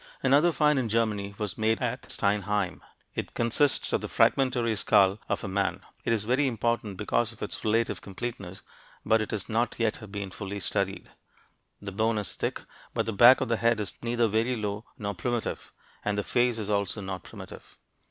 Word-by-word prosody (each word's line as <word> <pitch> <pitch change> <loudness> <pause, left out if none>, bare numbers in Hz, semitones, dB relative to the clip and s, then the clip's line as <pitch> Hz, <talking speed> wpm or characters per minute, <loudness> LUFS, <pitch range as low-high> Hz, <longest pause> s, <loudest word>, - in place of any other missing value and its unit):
Another 145 +6 +5
find 150 -3 +3
in 120 -3 -1
Germany 105 -3 0
was 105 -2 -4
made 110 +1 +2
at - - -3
Steinheim. 100 -1 0 0.3
It - - -5
consists 120 +4 +2
of - - +2
the - - -4
fragmentary 125 -4 +2
skull 100 0 +4
of - - -1
a - - -3
man. 95 0 -1 0.2
It - - 0
is 110 -3 +1
very 130 +6 +2
important 115 -4 -1
because 110 +3 0
of 115 - -9
its - - -4
relative 115 +2 +1
completeness, 95 -2 -6 0.4
but 110 0 +4
it 110 - -3
has 105 -3 -3
not 115 +2 0
yet 110 -2 -1
been 100 -2 -5
fully 100 +1 -5
studied. 100 +1 -2 0.7
The 100 -1 -6
bone 110 +3 +1
is 105 -4 -2
thick, - - -3 0.3
but - - +1
the 115 - -2
back 120 +6 +8
of - - 0
the 115 -1 +1
head 115 -1 +2
is 105 - -3
neither 120 0 +1
very 110 +4 +1
low 105 0 -3
nor 100 -1 -3
primitive, 120 +5 -3 0.3
and 105 0 -1
the 105 - 0
face 120 +1 +2
is 105 -1 -2
also 100 +1 0
not 95 -2 -5
primitive. - - -11
110 Hz, 190 wpm, -28 LUFS, 100-115 Hz, 0.7 s, back